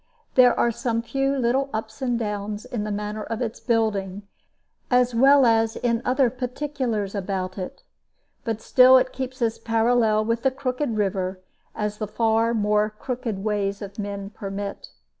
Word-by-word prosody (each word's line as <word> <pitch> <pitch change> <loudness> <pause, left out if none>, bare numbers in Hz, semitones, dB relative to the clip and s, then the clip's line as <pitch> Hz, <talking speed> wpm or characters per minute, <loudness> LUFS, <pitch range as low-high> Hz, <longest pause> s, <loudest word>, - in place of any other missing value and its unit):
There 250 -1 +5
are 235 - +3
some 230 0 -2
few 270 +3 0
little 265 +2 +1
ups 220 +1 -5
and 245 -2 0
downs 210 0 -4
in 240 -4 -4
the 210 - -3
manner 210 +1 -3
of 225 +1 -4
its 230 -3 -3
building, 205 -4 0 0.7
as 250 -1 +3
well 270 +3 +6
as 225 -1 +3
in 235 -1 0
other 255 -1 +2
particulars 250 -5 -3
about 185 -2 -3
it; 185 - -7 0.6
but 225 -2 -3
still 255 0 +7
it 255 0 +1
keeps 260 -1 -4
as 225 -1 0
parallel 225 -1 +2
with 230 +1 0
the 265 - +3
crooked 255 -2 -2
river 190 -2 -1 0.4
as 210 0 -3
the 215 - -2
far 225 +2 +1
more 210 0 +2
crooked 220 -2 -5
ways 205 -2 -1
of 200 +1 -8
men 200 -1 -5
permit. 200 -1 -6
225 Hz, 160 wpm, -24 LUFS, 210-250 Hz, 0.7 s, still